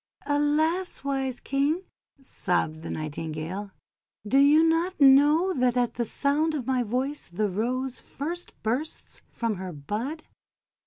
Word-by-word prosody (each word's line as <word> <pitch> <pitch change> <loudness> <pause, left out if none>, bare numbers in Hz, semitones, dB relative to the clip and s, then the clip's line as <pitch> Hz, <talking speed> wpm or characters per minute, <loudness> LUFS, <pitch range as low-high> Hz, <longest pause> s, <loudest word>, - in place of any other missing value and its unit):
"Alas! 305 +5 +1
wise 270 -2 -1
King!'1 280 0 -3
sobbed 175 -9 -1
the - - -7
Nightingale, 155 +5 -4 0.6
"do 270 +6 +4
you 295 +3 +6
not 330 +3 +1
know 295 +6 +6
that 250 -3 +1
at 245 -1 +1
the 235 - -2
sound 295 +6 +1
of 265 -5 -3
my 260 -1 +1
voice 255 +6 -2
the 200 +3 -1
Rose 250 +6 -2
first 340 +5 -6
bursts 250 +8 -3
from 230 -4 -2
her 185 0 -5
bud? 215 - -4
265 Hz, 135 wpm, -26 LUFS, 215-300 Hz, 0.6 s, you